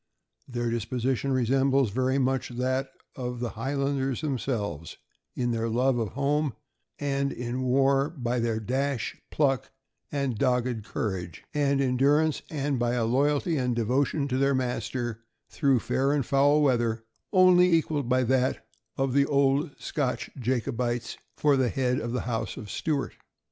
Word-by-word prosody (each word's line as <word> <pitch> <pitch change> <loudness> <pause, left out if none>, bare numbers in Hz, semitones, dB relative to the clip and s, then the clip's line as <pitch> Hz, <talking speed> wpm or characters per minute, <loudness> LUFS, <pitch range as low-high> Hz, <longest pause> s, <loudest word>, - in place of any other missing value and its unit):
Their 120 -2 -2
disposition 125 +3 -1
resembles 135 -1 +2
very 130 +4 +1
much 130 -1 0
that 130 +2 -1 0.3
of 125 -2 -4
the 120 -1 -3
Highlanders 135 +2 -1
themselves 110 - -3 0.2
— - - -47
in 120 -1 0
their 115 0 -1
love 125 +2 +2
of 110 -3 -3
home, 140 -1 0 0.4
and 140 -1 -1
in 125 +1 -4
war 135 +2 +3
by 125 -6 -2
their 115 -1 0
dash, 130 +3 -2
pluck, 135 -4 +1 0.4
and 140 -6 -1
dogged 125 -4 +1
courage 95 -7 -4
and 140 -2 +2
endur 140 +4 +3
ance, 155 -3 -2
and 140 -3 -1
by 120 0 +1
a 120 -2 +1
loyalty 145 +6 +1
and 125 -2 0
devotion 135 +5 +1
to 130 0 0
their 140 0 +3
master, 120 -2 -2 0.3
through 135 -3 +2
fair 135 +5 +1
and 140 -4 0
foul 145 +3 +4
weather, 120 -4 +1 0.3
only 180 -1 +6
equaled 155 -5 +1
by 130 0 +3
that 130 +1 +1 0.3
of 135 -1 0
the 140 0 +3
old 140 +2 +2
Scotch 135 -4 -2
Jacobites 120 -1 -2 0.2
for 145 -2 +3
the 130 -2 +2
head 130 -1 0
of 120 - -4
the 125 - -1
House 115 -2 -3
of 105 -6 -7
Stuart. 150 -4 -2
130 Hz, 155 wpm, -27 LUFS, 120-140 Hz, 0.4 s, only